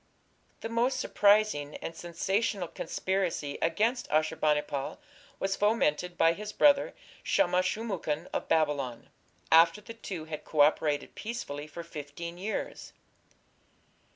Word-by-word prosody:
The - - -3
most 235 +3 +1
surprising 205 -8 +3
and 165 - -6
sensational 190 +3 -1
conspiracy 180 -5 -2
against 225 +9 +1
Ashur 155 +1 +2
bani 150 -1 +2
pal 140 -2 -4 0.4
was 195 0 0
fomented 180 -5 +1
by 165 0 +5
his 210 +4 -6
brother 285 +2 +4 0.3
Shamash 185 -10 +2
shum 225 +2 -4
ukin 165 -4 -2
of - - -2
Babylon, 145 -7 0 0.4
after 165 +3 +6
the 210 +2 -10
two 185 -8 -6
had 155 -1 -6
co 150 - +1
operated 145 0 +2
peacefully 155 -11 -5
for 170 +3 -8
fifteen 170 +2 -7
years. 210 +4 -4
170 Hz, 125 wpm, -29 LUFS, 150-210 Hz, 0.4 s, after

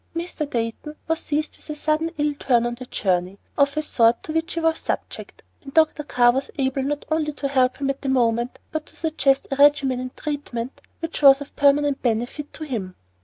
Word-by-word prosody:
Mr. 335 -3 -4
Dayton 235 +6 -3
was 325 0 0
seized 305 +1 -3
with - - -16
a 300 - -3
sudden 310 +2 0
ill 295 0 +1
turn 240 -3 +2
on 240 - -1
the 250 +1 -9
journey, 185 -2 -1 0.2
of 280 +1 +2
a 305 - +1
sort 230 -5 +3
to 310 - -5
which 325 +1 -1
he - - 0
was 325 0 +1
subject, - - -5 0.2
and 275 +1 -12
Dr. 315 -1 +4
Carr 245 -4 +4
was 270 +2 -2
able 270 0 0
not 290 +2 -2
only 310 -1 0
to 285 -1 -3
help 260 -2 +2
him 275 -1 0
at 275 - -9
the 275 - -2
moment, 240 -1 +1
but 315 -1 -4
to - - -13
suggest 290 -4 +1
a 275 - -1
regimen 280 -3 +4
and 255 0 -7
treatment 275 -5 -4 0.2
which 330 -1 -4
was 275 -1 +8
of 285 - -10
permanent 285 0 +3
benefit 245 +5 -2
to 315 - -8
him. 215 -11 -4
280 Hz, 215 wpm, -23 LUFS, 250-300 Hz, 0.2 s, was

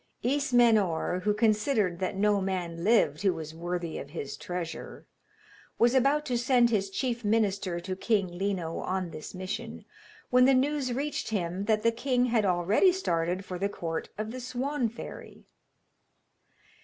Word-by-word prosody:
Ismenor, 230 - +2
who 210 - +3
considered 215 -4 +1
that 185 0 -2
no 205 0 +2
man 175 -3 -3
lived 225 +4 +3
who 195 -3 +2
was 160 -1 -7
worthy 170 0 -4
of 140 - -8
his 140 -3 -5
treasure, 175 +2 -6 0.7
was 240 +1 +4
about 275 +3 +3
to 245 -2 0
send 240 -1 +3
his 200 -3 +1
chief 240 +3 -2
minister 205 -4 +1
to 185 +1 -4
King 190 -3 0
Lino 190 -5 -2
on 185 -2 -2
this 155 +3 -8
mission, 220 +5 -5 0.5
when 250 0 +6
the 270 0 +5
news 275 0 +1
reached 280 +2 -2
him 185 -2 -2
that 215 0 +1
the 230 - +4
king 250 +1 +1
had 230 -4 +2
already 185 - +3
started 180 - -1
for 180 -1 -6
the 200 +2 0
court 165 -4 -4
of 215 +1 -4
the 255 - -6
Swan 255 +1 -2
fairy. 235 - -10
210 Hz, 155 wpm, -28 LUFS, 180-245 Hz, 0.7 s, when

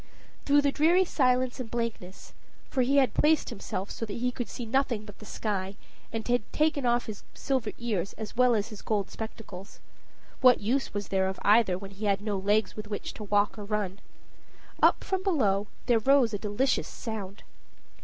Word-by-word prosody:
Through 290 0 +5
the 285 - +3
dreary 340 +6 +4
silence 255 -4 +1
and 245 -3 -5
blankness, 230 -6 -5 0.4
for 260 - +1
he 270 +3 +3
had 265 -2 +4
placed 310 0 +3
himself 195 0 -5
so - - -6
that 205 - -5
he 250 +1 0
could 245 -1 -5
see 240 - -6
nothing 240 -3 0
but 205 -2 -12
the 215 - -11
sky, 195 -2 -3 0.4
and 225 -1 -4
had 245 -1 +2
taken 300 -4 +1
off 240 0 +2
his 215 -2 -7
silver 260 -6 -1
ears 205 -6 -2
as 215 0 -7
well 250 -1 +4
as 210 +1 -1
his 215 -3 -9
gold 205 -3 -1
spectacles 215 -4 -8 0.6
what 255 -1 +8
was 210 -2 -1
the 195 - 0
use 190 - +3
of 190 - -4
either 205 -3 +4
when 195 +1 -9
he 200 +2 -6
had 200 -1 +2
no 210 -1 -2
legs 205 +1 +1
with 215 0 -7
which 205 -1 -5
to 215 - -8
walk 205 +1 +1
or - - -5
run? 200 -2 -2 0.8
up - - +5
from 380 -1 -1
below 215 - +1 0.2
there 240 -2 +4
rose 260 -1 +4
a 205 - -2
delicious 215 +6 0
sound. 210 -4 -6
220 Hz, 195 wpm, -28 LUFS, 205-255 Hz, 0.8 s, what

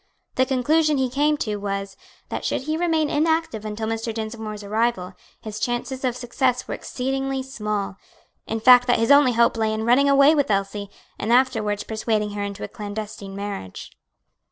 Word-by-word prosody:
The 260 0 +2
conclusion 300 +4 +2
he 260 -2 0
came 295 +3 +2
to 210 -6 -2
was, 195 -1 -4 0.3
that - - -4
should - - -1
he 310 +2 -1
remain 320 -2 +1
inactive 320 -7 0
until 215 +1 -4
Mr. 225 +1 -2
Dinsmore's 220 -1 -5
arrival, 210 -3 -1 0.3
his 215 -1 -6
chances 240 +3 -3
of 250 -2 0
success 250 +1 -1
were - - -4
exceedingly 270 +1 -3
small; 210 -6 -3 0.5
in 225 - -2
fact 245 +2 +7
that 245 - +4
his 230 +4 +2
only 280 -3 +6
hope 235 0 +3
lay 220 -1 +1
in 220 0 -2
running 265 +4 +4
away 280 +2 +6
with 285 -3 +1
Elsie, 200 0 -1 0.3
and 215 - -1
afterwards 225 -5 +2
persuading 215 -1 -1
her 205 0 -4
into 200 -1 -5
a - - -3
clandestine 205 -2 -7
marriage. 200 - -6
230 Hz, 175 wpm, -23 LUFS, 210-265 Hz, 0.5 s, fact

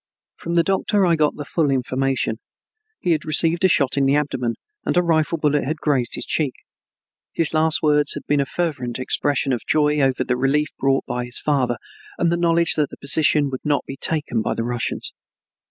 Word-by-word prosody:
From 170 +1 -5
the 170 - +4
doctor 195 +2 +1
I 170 -2 +3
got 155 -2 +1
the 145 - -7
full 155 0 0
information. 130 -3 -1 0.6
He 175 - 0
had 155 -2 +1
received 165 +3 +2
a - - +7
shot 140 -6 +1
in 135 -1 +3
the 140 - +3
abdomen 135 -5 -1 0.3
and - - -1
a 180 - +4
rifle 165 -1 +1
bullet 150 -2 +1
had 155 +5 -3
grazed 140 -5 0
his - - -5
cheek. 145 -5 -1 0.8
His 165 -2 0
last 160 0 +3
words 150 -1 +2
had - - -7
been 145 0 +1
a 140 - 0
fervent 140 -9 -3
expression 135 +1 +1
of 120 - -3
joy 150 -1 +2
over 135 -2 +1
the 125 - -1
relief 145 +3 +1
brought 135 0 +1
by 125 0 -3
his 120 0 -3
father 140 -4 0 0.4
and 170 - +1
the - - +2
knowledge 170 -1 +2
that 150 -3 0
the - - -11
position 145 0 +3
would 130 - -5
not 145 -1 0
be 135 - -7
taken 145 -6 -1
by - - -2
the 115 - -2
Russians. 120 0 -3
145 Hz, 205 wpm, -21 LUFS, 135-160 Hz, 0.8 s, a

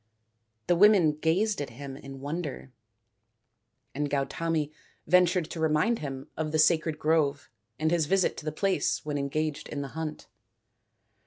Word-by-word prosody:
The 175 - +3
women 195 -4 +6
gazed 165 +6 0
at 140 - -4
him 135 +3 -8
in 135 -1 -10
wonder, 145 -2 -5 1.2
and 145 +1 -2
Gautami 150 +2 -1 0.3
ventured 180 0 +3
to 165 - -5
remind 160 +9 +2
him 135 -2 -6
of 155 -1 -2
the 155 - +1
sacred 155 0 +3
grove 150 -3 +1 0.3
and 155 +1 0
his 165 -3 +2
visit 190 +2 +2
to - - -8
the 155 - -1
place 195 +1 0
when 145 -1 -2
engaged 150 +2 -2
in 145 - -4
the 140 - -6
hunt. 160 0 -5
155 Hz, 150 wpm, -28 LUFS, 145-170 Hz, 1.2 s, women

